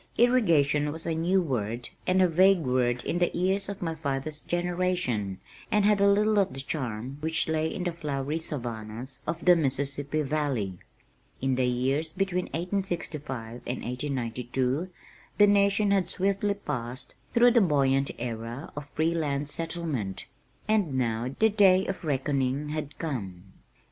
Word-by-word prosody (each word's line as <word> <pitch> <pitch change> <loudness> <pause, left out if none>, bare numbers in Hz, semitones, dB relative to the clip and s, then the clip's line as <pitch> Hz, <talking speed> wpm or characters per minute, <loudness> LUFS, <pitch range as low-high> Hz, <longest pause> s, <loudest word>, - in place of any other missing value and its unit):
"Irrigation" 165 - +3
was 160 +2 -7
a 165 - 0
new 175 +4 +2
word 120 -4 -2 0.2
and 185 +1 +4
a - - +5
vague 185 +2 +5
word 125 -2 +1
in 175 - -1
the 175 - +3
ears 190 +3 0
of 200 -2 -5
my 165 -1 -1
father's 150 -1 -3
generation, 175 - -1 0.3
and 210 -2 +3
had 210 -1 +4
little 205 +1 +4
of 195 -1 +1
the - - -3
charm 130 -2 -4
which 160 +1 0
lay 160 0 +1
in 180 - -4
the 175 - 0
"flowery 150 -2 -3
savannahs" 120 -3 -5
of 170 +1 -3
the 180 -1 +8
Mississippi 145 0 -1
valley. 135 -11 -1 0.6
In 135 0 0
the 125 0 +2
years 135 +6 0
between 185 -1 0
1865 160 - -4
and 125 - -3
1892 125 +3 -2 0.5
the 205 - +8
nation 200 0 +3
had 190 -3 +2
swiftly 200 +2 +1
passed 125 -9 -5 0.2
through 240 +1 +7
the 235 -1 +5
buoyant 140 -5 +2
era 120 +4 -5
of 145 -1 -7
free 160 +3 0
land 145 -3 -1
settlement, 155 - -3 0.4
and 205 -10 +2
now 120 +1 -1
the 220 - +4
day 195 -3 +5
of 195 - -4
reckoning 140 -1 0
had 150 -1 -4
come. 100 - -4
150 Hz, 150 wpm, -28 LUFS, 130-180 Hz, 0.6 s, the